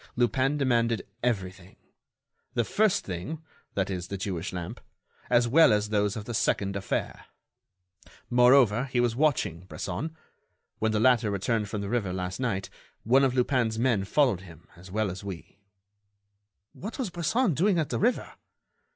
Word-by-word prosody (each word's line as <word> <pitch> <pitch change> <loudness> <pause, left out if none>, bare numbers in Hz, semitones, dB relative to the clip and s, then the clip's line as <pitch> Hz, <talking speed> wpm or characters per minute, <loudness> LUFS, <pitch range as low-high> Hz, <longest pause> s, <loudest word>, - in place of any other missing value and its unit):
Lupin 130 +4 +1
demanded 120 -4 +1 0.2
everything, 95 -6 -3 0.8
'the 120 - +2
first 210 - +1
thing 95 - -5 0.4
(that 100 0 0
is, 90 -1 -4
the 100 - -4
Jewish 95 -4 -3
lamp) 90 -2 -6 0.5
as 120 0 +4
well 160 +4 +6
as 105 0 +1
those 105 -1 +1
of 105 -2 -6
the 120 - -5
second 100 -2 0
affair.' 100 0 -3 1.0
Moreover, 125 -1 +5
he 130 -2 -1
was 120 -2 +1
watching 125 - +1
Bresson. 150 - -5 0.6
When 110 0 +1
the 110 - +1
latter 120 -2 +4
returned 105 +1 -1
from 105 - -3
the 100 - -4
river 110 -5 -1
last 90 +1 -4
night, 105 -7 -1 0.4
one 130 +5 +4
of 130 -2 +2
Lupin's 125 -3 +1
men 115 -4 +2
followed 115 -2 +2
him 85 -3 -14
as 90 +2 -14
well 105 0 -1
as 95 +2 -8
we." 100 0 -8 1.1
"What 215 +6 -7
was 245 -9 -3
Bresson 175 +5 +1
doing 185 +6 +2
at 155 -3 0
the - - -2
river?" 240 +4 0
115 Hz, 160 wpm, -27 LUFS, 100-130 Hz, 1.1 s, well